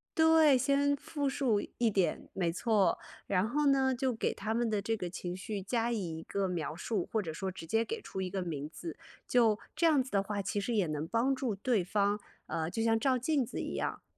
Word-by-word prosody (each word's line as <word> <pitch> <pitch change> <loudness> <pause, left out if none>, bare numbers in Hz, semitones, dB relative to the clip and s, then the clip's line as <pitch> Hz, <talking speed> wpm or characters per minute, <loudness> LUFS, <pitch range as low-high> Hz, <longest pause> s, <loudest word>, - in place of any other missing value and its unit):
对， 320 -3 +6
先 280 +2 +2
复 285 +1 -3
述 260 -6 +1 0.2
一 235 -2 +4
点， 190 -6 0
没 175 -3 0
错。 205 +2 +2 0.3
然 195 +1 +1
后 295 +3 +1
呢， 265 -1 +3
就 260 0 0
给 225 - 0
他 220 - -3
们 235 0 +1
的 210 -2 +1
这 225 +3 -1
个 180 -5 -4
情 175 0 -5
绪 200 +2 -4
加 230 +4 0
以 175 -8 -3
一 - - -9
个 200 -1 -1
描 165 -4 -3
述， 195 +2 -2
或 220 - +1
者 165 -6 -3
说 190 +4 -3
直 180 - -9
接 225 +7 +2
给 455 - -4
出 190 - -6
一 185 - -2
个 190 0 -2
名 150 -4 -4
字。 335 - -7 0.3
就 230 -4 +4 0.2
这 335 - +3
样 290 -5 +4
子 260 - -11
的 200 - +3
话， 205 +1 -3
其 205 - -1
实 235 +3 -1
也 200 -4 +3
能 155 0 -3
帮 235 +7 +2
助 260 -5 -1
对 210 -1 +1
方， 205 +3 +1 0.3
呃， 160 0 -2
就 225 +5 -2
像 225 0 +3
照 260 +1 +2
镜 275 +2 +1
子 - - -5
一 - - -3
样， - - -3
220 Hz, 250 characters per minute, -32 LUFS, 185-260 Hz, 0.3 s, 对